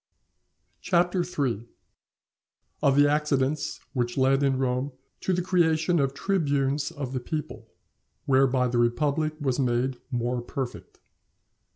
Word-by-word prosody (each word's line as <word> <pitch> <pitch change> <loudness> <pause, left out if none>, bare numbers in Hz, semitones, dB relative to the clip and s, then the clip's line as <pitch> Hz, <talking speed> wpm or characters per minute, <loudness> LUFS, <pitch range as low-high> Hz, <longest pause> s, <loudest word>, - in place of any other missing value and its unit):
CHAPTER 175 0 +2
III.—Of 135 - -5
the 145 0 +6
Accidents 145 -1 0
which 120 -2 -1
led 135 +1 +3
in 135 -2 +2
Rome 130 +1 -1 0.3
to - - -1
the 180 -1 0
creation 170 -2 +2
of 135 -1 0
Tribunes 145 -7 0
of 135 -3 -6
the 130 - -1
People; 150 +4 -5 0.6
whereby 130 -1 +3
the 120 0 0
Republic 145 +6 +1
was 135 -3 -1
made 125 0 0
more 120 -1 -1
perfect. 125 +1 -6
135 Hz, 115 wpm, -26 LUFS, 125-155 Hz, 0.6 s, the